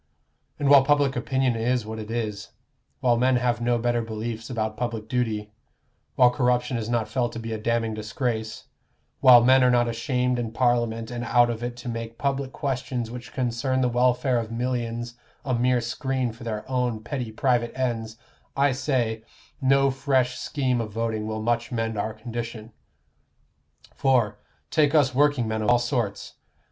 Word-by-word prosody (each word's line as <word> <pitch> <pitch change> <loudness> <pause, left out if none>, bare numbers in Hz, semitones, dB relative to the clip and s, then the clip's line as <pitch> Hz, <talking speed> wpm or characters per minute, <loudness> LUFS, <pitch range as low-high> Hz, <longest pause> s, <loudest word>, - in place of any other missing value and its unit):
And 145 - -1
while 140 -1 +8
public 145 -1 +2
opinion 130 0 0
is 120 0 0
what 110 0 -6
it 110 0 -7
is 110 -2 -4 0.5
while 120 -3 +3
men 130 +2 +3
have 120 -1 0
no 120 0 +2
better 120 0 0
beliefs 115 +1 -5
about 110 -3 -2
public 115 -2 -4
duty 110 -4 -2 0.6
while 125 -1 +6
corruption 125 -1 +1
is 115 -1 -3
not 120 -2 0
felt 120 -2 -1
to - - -5
be 115 0 -5
a 110 - -4
damning 115 0 0
disgrace 110 +1 -3 0.5
while 120 -2 +8
men 130 +1 +6
are 125 - +5
not 120 -1 +3
ashamed 125 +1 0
in 115 -2 -4
Parliament 120 -2 0
and 120 0 -4
out 120 0 +3
of 115 0 -5
it 120 0 -4
to 120 - -9
make 115 -1 -5
public 140 -1 -1
questions 125 -4 -3
which 120 0 -8
concern 130 +1 -1
the 125 - +2
welfare 125 +1 +2
of 115 -1 -5
millions 120 -1 -3 0.3
a 130 - 0
mere 125 +1 +2
screen 130 +1 -2
for 115 +2 -12
their 110 -2 -4
own 125 -4 -1
petty 120 -2 -4
private 120 0 +1
ends, 115 -3 -2 0.4
I 140 0 +4
say, 125 -4 -1 0.4
no 135 +1 +4
fresh 130 -2 +1
scheme 130 -4 -1
of 110 -2 -5
voting 110 -1 -2
will 110 0 -3
much 120 0 0
mend 115 -2 -2
our 110 +1 -3
condition. 115 0 -6 1.2
For, 115 -6 +1 0.3
take 150 -1 +3
us 145 -4 +4
workingmen 125 -6 +2
of 105 - 0
all 120 - +6
sorts. 120 -4 -3
120 Hz, 170 wpm, -25 LUFS, 115-125 Hz, 1.2 s, while